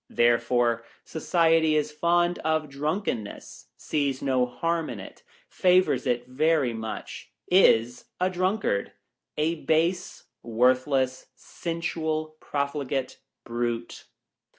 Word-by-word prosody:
Therefore, 120 0 +2 0.2
Society 160 -1 +2
is 150 0 0
fond 175 +3 +1
of 155 -1 0
drunken 150 - -2
ness, 105 - -11
sees 140 -3 -1
no 130 -2 +1
harm 165 +5 -2
in - - -6
it, - - -11 0.3
favors 185 - +2
it 120 0 0
very 140 0 +1
much, 110 -1 -7 0.2
is 120 -10 +4
a 180 - +2
drunkard 185 - -1 0.2
— - - -61
a 155 +1 -1
base, 170 +3 0 0.2
worthless, 130 +3 +1
sensual, 160 -2 -4
pro 145 - -2
fligate 140 -2 -4 0.3
brute. 120 0 -4
150 Hz, 110 wpm, -26 LUFS, 125-165 Hz, 0.3 s, is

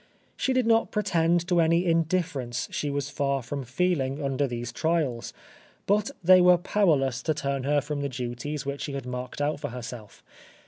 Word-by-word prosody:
She 265 - 0
did 255 -2 +2
not 225 0 +3
pretend 175 -4 +1
to 175 -2 +3
any 165 +2 +3
indifference 165 -7 0
she 145 - -2
was 140 0 -3
far 140 -2 -1
from 140 +3 -4
feeling 135 0 0
under 140 0 0
these 120 -1 -5
trials; 150 -4 -1 0.5
but 210 +4 +2
they 185 +1 +7
were 180 0 +6
powerless 150 - +1
to 155 - 0
turn 140 -2 -2
her 145 +1 +2
from 145 0 -4
the 140 - -2
duties 130 +3 -4
which 140 0 -4
she 145 - -4
had 135 -2 -5
marked 125 +2 -5
out 145 0 0
for - - -4
herself. 120 -3 -9
145 Hz, 180 wpm, -27 LUFS, 130-170 Hz, 0.5 s, they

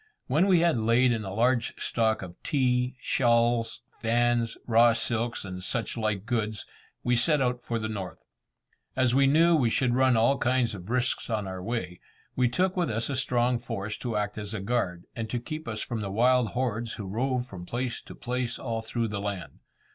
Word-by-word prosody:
When 155 +9 +2
we 180 -4 +5
had 170 -5 +3
laid 115 +3 +3
in 115 -2 -1
a 95 - -5
large 120 +3 +1
stock 110 -3 0
of 90 -2 -9
tea, 125 -2 +1
shawls, 115 -1 +1 0.2
fans, 120 0 +1
raw 115 0 +5
silks, 115 -1 -2
and 90 -1 -6
such 115 +3 -2
like 110 -3 -1
goods, 110 -2 -1 0.4
we 125 - +2
set 145 +5 +3
out 125 -2 0
for 115 - -2
the 110 -1 -2
north. 100 -4 -6 0.7
As 130 -2 +2
we 135 +1 +5
knew 165 +4 +5
we 130 -7 +3
should 125 +1 +1
run 130 -1 +4
all 115 +5 +3
kinds 120 -2 +1
of 95 0 -9
risks 125 +1 0
on 105 -3 -1
our 95 -1 -5
way, 90 -4 -4 0.4
we 125 -1 +3
took 185 +9 +1
with 175 -4 0
us 115 +4 -1
a - - -1
strong 125 -1 +1
force 105 0 -4
to 115 -4 -2
act 105 0 -2
as 105 +1 -5
a - - -3
guard, 95 -5 -1
and 115 -1 -4
to 120 - -1
keep 155 +6 -6
us 110 -2 -3
from 115 -2 -4
the 100 - -3
wild 125 +4 +3
hordes 120 -2 -1
who 105 - -6
rove 125 +5 -1
from 90 -8 -9
place 120 0 -3
to - - -12
place 125 0 -3
all 115 -3 -3
through 115 0 -2
the 100 -1 -3
land. 100 -3 -5
120 Hz, 200 wpm, -28 LUFS, 110-125 Hz, 0.7 s, we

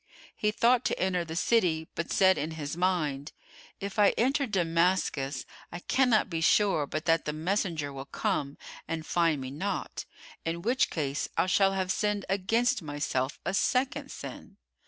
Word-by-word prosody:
He 210 - +1
thought 235 +3 +3
to - - 0
enter 180 -1 +1
the 165 -1 -7
city, 170 -5 +2
but 170 - -4
said 190 -1 +5
in 150 - -2
his 145 0 -4
mind, 155 -6 -1 0.5
"If 200 +1 -5
I 205 - +5
enter 270 +4 +2
Damascus, 165 - 0 0.3
I - - -5
cannot 240 +4 +2
be 165 -4 -3
sure 170 -4 +3
but 155 +3 -4
that 165 -1 +2
the 150 - -2
messenger 160 -3 -1
will 135 0 -7
come 140 -1 -2 0.3
and 160 -1 -4
find 165 -4 +2
me 130 0 -6
not, 190 +8 -4 0.4
in 170 +1 -3
which 250 +4 +2
case 145 -3 -2
I - - +3
shall 195 +1 +3
have 190 -1 -1
sinned 210 -1 0
against 220 +5 +1
myself 145 -3 -2
a - - -1
second 255 +7 0
sin." - - -9
175 Hz, 165 wpm, -29 LUFS, 155-205 Hz, 0.5 s, said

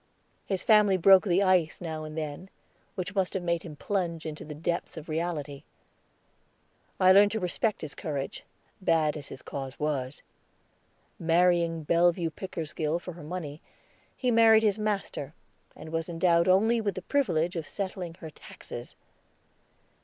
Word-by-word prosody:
His 190 -2 -2
family 210 -3 +5
broke 190 +2 +6
the 190 +1 +3
ice 185 -4 +2
now 160 -3 -5
and 155 +1 -8
then, 155 +4 -5 0.5
which 185 -1 -4
must 190 -2 0
have 185 - -2
made 170 -1 0
him 160 -4 -9
plunge 170 -1 -2
into 155 -1 -6
the 150 0 -8
depths 170 +2 -3
of 160 - -8
reality. 155 -3 -3 1.4
I 185 0 +6
learned 200 +2 +7
to 220 - -1
respect 200 +4 -1
his 155 -2 -5
courage, 140 -4 -5 0.4
bad 160 -4 +2
as 150 - -7
his 130 - -9
cause 135 -1 -6
was. 140 -3 -2 1.0
Marrying 170 -1 +2
Bellevue 170 +1 +2
Pickersgill 160 -3 -3
for 180 +1 -8
her 170 - -11
money, 155 -2 -6 0.6
he 250 -2 0
married 225 -1 +6
his 210 -1 +2
master, 200 -8 -3 0.4
and 155 +1 -10
was 165 0 -2
endowed 170 0 +2
only 220 +5 +4
with 200 -4 -2
the 185 - -6
privilege 180 - 0
of 160 -3 -4
settling 185 -4 -4
her 160 -2 -9
taxes. - - -10
170 Hz, 155 wpm, -28 LUFS, 155-190 Hz, 1.4 s, learned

